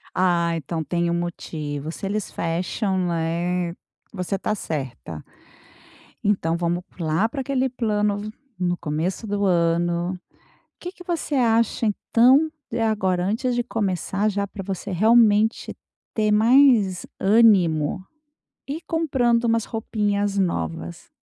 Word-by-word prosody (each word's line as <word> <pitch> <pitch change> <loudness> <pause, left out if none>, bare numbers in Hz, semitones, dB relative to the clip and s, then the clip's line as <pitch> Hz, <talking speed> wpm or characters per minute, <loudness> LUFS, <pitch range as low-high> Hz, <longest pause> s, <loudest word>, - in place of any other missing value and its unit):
Ah, 170 -2 +2
então 160 +1 -4
tem 170 +2 -1
um - - 0
motivo 155 -4 -4
se 170 - -6
eles 205 +1 -2
fecham, 180 +4 -2
né, 170 +1 -1 0.4
você 195 0 -2
tá 210 - -2
certa. 130 - -5 1.0
Então 180 -5 +1
vamos 175 +1 -1
p 175 - -6
lá 160 +7 +1
pra 270 +4 -5
aquele 265 0 0
plano, 210 -3 -1 0.3
no 175 -1 0
começo 170 +7 -3
do 205 0 -1
ano 175 0 +1 0.6
Que 355 - -6
que 360 - -14
você 345 -4 -3
acha 230 -2 +2
então, 255 +8 +3 0.2
de 235 - -2
agora 190 -5 +1
antes 240 +5 0
de 240 - 0
começar 205 -2 -1
já, 200 -1 -2
pra 195 0 -8
você 195 +1 -5
realmente 220 +2 +3 0.4
ter 215 -1 +1
mais 225 -4 +4
ânimo, 190 -6 +3 0.6
ir 295 +4 -4
comprando 250 -8 +1
umas 230 -1 +2
roupinhas 205 -2 -1
novas? 80 - -3
195 Hz, 125 wpm, -23 LUFS, 170-225 Hz, 1.0 s, mais